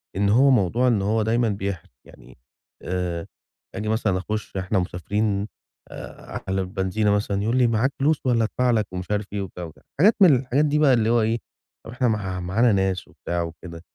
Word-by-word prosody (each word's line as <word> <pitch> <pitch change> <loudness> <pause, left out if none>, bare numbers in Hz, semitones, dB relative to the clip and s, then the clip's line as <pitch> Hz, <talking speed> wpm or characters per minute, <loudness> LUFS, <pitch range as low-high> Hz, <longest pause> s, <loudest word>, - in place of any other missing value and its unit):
إن 100 +1 +1
هو 130 +7 +5
موضوع 120 0 +2
إن 115 -5 +2
هو 110 +3 +1
دايمًا 115 +1 +1
بيحرِج. 100 -3 -4 0.2
يعني - - -17 0.5
آآ 90 -2 -3 0.5
آجي 105 +2 -3
مثلًا 110 -4 +1
أخُش 105 +1 -4
إحنا 95 +2 0
مسافرين 100 +3 -2 0.4
آآ - - -8
على 95 0 0
البنزينة 95 +3 -1
مثلًا 100 -1 0
يقول 115 +4 0
لي 125 -2 +4
معاك 115 +4 +1
فلوس 150 +2 +2
والّا 120 -3 +2
أدفع 125 +3 +1
لك 110 -3 +1
ومش 90 +2 -5
عارف 105 0 0
إيه 100 - -2
وبتاع 90 -2 -7
وكده. 80 -2 -11 0.2
حاجات 210 +7 +6
من 175 -8 +8
الحاجات 130 +3 +1
دي 150 0 +1
بقى 145 -3 +5
اللي 115 -2 +2
هو 120 0 +3
إيه 110 +1 +1 0.5
طَب - - -8
إحنا 125 +1 0
مع 95 -5 -2
معانا 105 +7 +2
ناس 95 -2 0
وبتاع 85 0 -4
وكده. 85 0 -9
105 Hz, 195 wpm, -23 LUFS, 95-120 Hz, 0.5 s, من